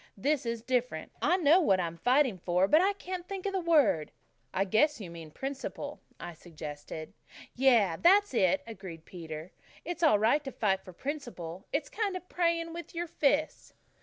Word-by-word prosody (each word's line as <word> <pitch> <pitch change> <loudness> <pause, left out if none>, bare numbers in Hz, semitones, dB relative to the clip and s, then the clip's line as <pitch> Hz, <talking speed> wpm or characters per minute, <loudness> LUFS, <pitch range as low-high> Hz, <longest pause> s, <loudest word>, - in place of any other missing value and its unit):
"This 270 +3 0
is 230 -1 -3
different. 245 -10 -1
I 350 +5 +3
know 340 +1 +5
what 195 - +3
I'm 170 -1 -3
fighting 250 - +3
for 180 +2 +2
but 310 +9 +5
I 395 +2 +3
can't 365 -2 -6
think 390 -1 -6
of 395 - -1
the 380 - +1
word." 300 - +3 0.4
"I 195 - 0
guess 230 +10 +2
you 185 -5 -7
mean 165 -2 -9
principle," 270 - -5 0.2
I 175 - -7
suggested. 155 -1 -8 0.4
"Yes, 235 -10 +3
that's 400 0 +5
it," 235 +6 +2
agreed 185 -7 -9
Peter. 160 -1 -8 0.3
"It's 350 0 -4
all 310 -10 +5
right 230 +8 +3
to 270 - -5
fight 195 -5 0
for 185 - -11
principle. 195 - -6
It's 285 +1 -1
kind 410 -4 -2
of 365 - -12
praying 335 -1 0
with 340 +1 -8
your 345 +1 -1
fists." 300 -1 0
255 Hz, 180 wpm, -30 LUFS, -, 0.4 s, know